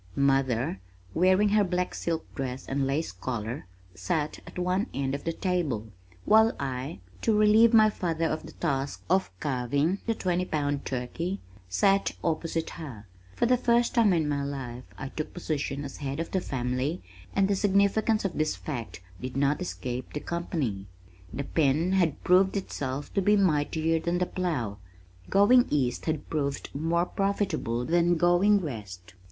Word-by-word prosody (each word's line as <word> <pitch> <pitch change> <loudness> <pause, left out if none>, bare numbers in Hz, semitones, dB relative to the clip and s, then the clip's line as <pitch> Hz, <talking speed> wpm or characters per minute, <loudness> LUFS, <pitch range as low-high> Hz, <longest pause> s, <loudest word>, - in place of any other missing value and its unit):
Mother, 130 -7 +1 0.3
wearing 185 +4 +4
her 210 0 +4
black 180 -1 -1
silk 165 -1 -2
dress 130 -2 -4
and 135 0 0
lace 145 +4 -1
collar, 115 +4 -4 0.3
sat 145 - -2
at - - -10
one 180 +5 0
end 135 -1 -1
of 140 - -4
the 165 - +1
table, 160 - -1 0.4
while 220 +1 +5
I, 130 -7 -4 0.2
to 220 -2 +2
relieve 215 +2 +6
my 215 -2 +6
father 165 -4 -1
of 160 -1 -2
the 160 - -11
task 140 -4 -2
of 190 +1 +3
carving 140 +7 0
the 230 - +1
twenty 180 -2 0
pound 145 -4 -1
turkey, 150 +10 -3 0.3
sat 195 - +2
opposite 165 0 -1
her. 135 -11 -8 0.3
For - - +2
the 250 +1 +4
first 235 -1 +2
time 230 -5 +4
in 165 -4 +2
my 140 -1 -1
life 130 -3 -5
I 135 - -5
took 155 +2 -5
position 145 -4 -3
as 140 - -7
head 140 +1 -4
of 165 - -3
the 190 - 0
family 130 +4 -2 0.3
and 195 -1 +4
the 200 - +2
significance 200 +2 +2
of 190 - -2
this 155 0 +1
fact 120 - -6 0.2
did 130 +1 -5
not 140 +4 +2
escape 125 -8 -4
the 150 - -2
company. 145 - -3 0.4
The 140 - -3
pen 155 +4 +1
had 175 -6 +1
proved 190 +2 +4
itself 140 -7 -4
to 195 - +2
be 210 +2 +4
mightier 160 -2 +2
than 170 +2 -1
the 180 - +1
plow. 145 - -2 0.5
Going 240 +6 +5
east 130 -4 0
had 155 -2 -1
proved 140 -3 -2
more 165 +4 +1
profitable 195 - -1
than 175 +2 +3
going 180 +4 +4
west! 100 - -7
160 Hz, 165 wpm, -28 LUFS, 135-185 Hz, 0.5 s, relieve